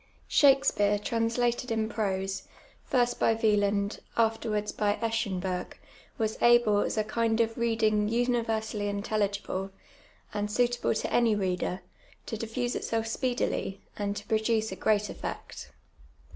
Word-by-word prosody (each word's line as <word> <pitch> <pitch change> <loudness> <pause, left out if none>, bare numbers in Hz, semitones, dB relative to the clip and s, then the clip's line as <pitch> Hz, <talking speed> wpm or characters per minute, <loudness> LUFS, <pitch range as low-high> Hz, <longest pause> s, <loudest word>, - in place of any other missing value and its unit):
Shakspeare, 270 -8 +4
translated 235 +3 0
in 220 -1 0
prose, 195 -3 -2 0.4
first 245 -2 +1
by 225 - +3
Wieland, 205 -2 +1 0.2
afterwards 220 -2 +1
by 205 -1 +1
Eschenburg, 195 -5 -2 0.4
was 220 -1 -2
able, 240 -3 +5
as 205 - -1
a 215 - +2
kind 225 +1 0
of 225 -1 +1
reading 220 -3 +1
universally 225 -3 0
intelligible, 200 -2 -2 0.6
and 205 0 -2
suitable 240 +1 +1
to - - -1
jmy 225 -3 +2
reader, 185 -1 -1 0.4
to 225 - -4
diffusa 230 +3 -2
itself 225 -1 -2
speedily, 235 -4 -1 0.2
and 205 -1 -2
to - - -6
produce 220 0 +1
a - - -4
great 210 -1 +1
effect. - - -7
220 Hz, 125 wpm, -29 LUFS, 205-230 Hz, 0.6 s, able